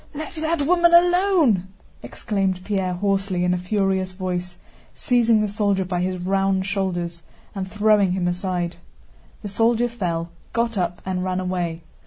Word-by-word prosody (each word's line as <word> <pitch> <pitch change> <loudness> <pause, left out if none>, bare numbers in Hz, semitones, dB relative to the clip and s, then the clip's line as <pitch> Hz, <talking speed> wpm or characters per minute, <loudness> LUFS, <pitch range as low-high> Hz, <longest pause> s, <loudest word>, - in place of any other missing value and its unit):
"Let 310 +2 -6
that 320 -1 -1
woman 345 +2 +4
alone!" 350 - +4 0.3
exclaimed 195 -4 -2
Pierre 190 -3 -1
hoarsely 195 -1 0
in 180 0 +2
a - - 0
furious 190 0 0
voice, 180 -1 -4 0.4
seizing 235 -3 +3
the 215 - +1
soldier 200 -2 0
by 180 -1 -2
his 185 0 -1
round 190 +1 0
shoulders 175 -4 -2 0.3
and 190 -2 -4
throwing 210 -2 +3
him 180 -1 -1
aside. 175 -1 -2 0.7
The - - -4
soldier 230 +3 +2
fell, 175 -8 -3 0.2
got 230 0 0
up, 175 -2 -2
and 185 -1 -2
ran 185 0 -1
away. 175 -3 -3
190 Hz, 150 wpm, -22 LUFS, 180-220 Hz, 0.7 s, woman